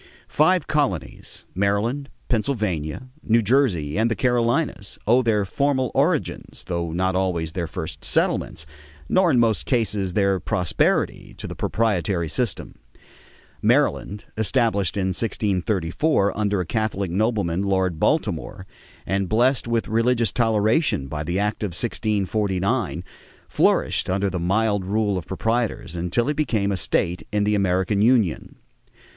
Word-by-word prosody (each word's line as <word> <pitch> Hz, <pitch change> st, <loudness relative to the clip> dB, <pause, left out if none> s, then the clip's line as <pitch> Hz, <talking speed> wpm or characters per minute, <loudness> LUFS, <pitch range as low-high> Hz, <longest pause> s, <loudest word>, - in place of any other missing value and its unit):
Five 170 Hz, +2 st, +2 dB
colonies, 140 Hz, -, -2 dB
Maryland, 105 Hz, +9 st, 0 dB, 0.2 s
Pennsylvania, 105 Hz, -, -2 dB
New 115 Hz, +1 st, +2 dB
Jersey, 105 Hz, -, +1 dB
and 115 Hz, +1 st, +2 dB
the 115 Hz, -, 0 dB
Carolinas, 120 Hz, -2 st, 0 dB
owe 120 Hz, +4 st, +4 dB
their 110 Hz, -4 st, +1 dB
formal 130 Hz, +2 st, 0 dB
origins, -, -, -1 dB
though 85 Hz, -2 st, -3 dB
not 95 Hz, +2 st, 0 dB
always 90 Hz, -4 st, -1 dB
their 85 Hz, -1 st, -3 dB
first -, -, -6 dB
settlements, 80 Hz, -, 0 dB, 0.4 s
nor 185 Hz, -2 st, +3 dB
in 135 Hz, -, +3 dB
most 115 Hz, -2 st, +1 dB
cases 105 Hz, -7 st, +1 dB
their 100 Hz, -1 st, +2 dB
prosperity, 90 Hz, -6 st, 0 dB
to -, -, -7 dB
the -, -, -5 dB
proprietary 95 Hz, -6 st, 0 dB
system. 95 Hz, -, -3 dB, 0.8 s
Maryland, 105 Hz, +1 st, +1 dB
established 110 Hz, -4 st, +1 dB
in 95 Hz, -1 st, 0 dB
1634 100 Hz, -, 0 dB
under 105 Hz, -2 st, 0 dB
a 90 Hz, -, -1 dB
Catholic 100 Hz, -2 st, -2 dB
nobleman, 100 Hz, -3 st, 0 dB
Lord 95 Hz, -4 st, 0 dB
Baltimore, 100 Hz, -, -1 dB, 0.4 s
and 95 Hz, 0 st, -1 dB
blessed 120 Hz, +4 st, +2 dB
with 115 Hz, -1 st, 0 dB
religious 115 Hz, -1 st, +2 dB
toleration 110 Hz, -, +1 dB
by 75 Hz, -1 st, -4 dB
the 85 Hz, +4 st, -2 dB
act 105 Hz, +1 st, -1 dB
of 100 Hz, -5 st, -3 dB
1649, 100 Hz, -, -1 dB, 0.4 s
flourished -, -, +1 dB
under 95 Hz, +1 st, 0 dB
the 90 Hz, -, -3 dB
mild 100 Hz, +3 st, +1 dB
rule 100 Hz, +1 st, 0 dB
of 85 Hz, -, -11 dB
proprietors 110 Hz, -3 st, -2 dB
until 90 Hz, +8 st, -1 dB
it 150 Hz, -, 0 dB
became 110 Hz, -9 st, 0 dB
a -, -, 0 dB
state 90 Hz, 0 st, 0 dB
in 105 Hz, 0 st, +1 dB
the 105 Hz, +1 st, +1 dB
American 95 Hz, 0 st, +1 dB
union. 110 Hz, -7 st, +2 dB
105 Hz, 135 wpm, -23 LUFS, 90-115 Hz, 0.8 s, owe